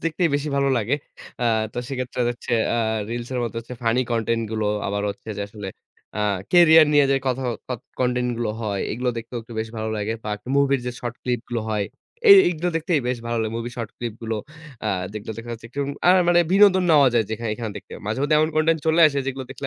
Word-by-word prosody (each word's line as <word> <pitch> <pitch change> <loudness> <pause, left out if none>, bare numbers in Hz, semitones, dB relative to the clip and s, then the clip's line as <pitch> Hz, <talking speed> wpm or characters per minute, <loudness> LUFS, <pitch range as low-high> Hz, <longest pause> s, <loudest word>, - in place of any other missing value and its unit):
দেখতেই 165 +1 +1
বেশি 145 +1 -1
ভালো 140 0 +2
লাগে। 120 +3 +1 0.5
আ - - +2 0.3
তো - - -5
সেক্ষেত্রে 130 -2 -4
হচ্ছে 120 - -6 0.2
আ - - +1 0.3
reels 120 0 -4
এর 125 - -1
মধ্যে 115 -1 -4
হচ্ছে 120 +2 -9
ফানি 115 +2 +2
কনটেন্ট 115 0 0
গুলো, 110 -1 -1 0.2
আবার 100 +1 -2
হচ্ছে 105 - -11
যে 100 - -2
আসলে 105 -1 -7 0.5
আ - - -3 0.3
কেরিয়ার 160 -3 +8
নিয়ে 145 -1 +6
যে 135 - +4
কথা 130 0 0 0.3
কথ 125 -3 -4 0.2
কনটেন্ট 125 0 +1
গুলো 115 -3 -1
হয়। 100 -3 -2
এগুলো 125 +3 -2
দেখতেও 120 +1 -5
একটু 115 +1 -13
বেশ 110 - -4
ভালো 110 0 -3
লাগে। 105 +1 -2
বাক 105 -1 -3 0.2
মুভির 140 -2 +3
যে 125 - -2
শর্ট 120 -1 -4
ক্লিপগুলো 120 -1 -2
হয়, 105 -2 0 0.4
এ - - +10 0.2
এইগুলো 175 0 -2
দেখতেই 165 -2 +1
বেশ 125 - -1
ভালো 115 0 -1
লাগে। 110 0 -3
মুভির 120 +1 -5
শর্ট 115 -2 -4
ক্লিপগুলো 115 -1 -4 0.5
আ - - +1 0.2
যেগুলো 105 +1 -6
দেখা 115 - -8
যাচ্ছে 115 0 -8 0.4
আ - - +6
আর 185 - +8
মানে 175 0 +5
বিনোদন 195 -2 +6
নেওয়া 145 -4 +6
যায় 115 - +3
যেখানে 115 +1 -3
এখানে 110 0 -5
দেখতে। 100 - -11
মাঝেমধ্যে 135 +8 +1
এমন 155 - +3
কনটেন্ট 160 +1 +3
চলে 160 +1 +4
আসে 140 - -2
যেগুলো 135 -1 -3
দেখলে 135 +1 -6
120 Hz, 215 wpm, -23 LUFS, 115-140 Hz, 0.5 s, এ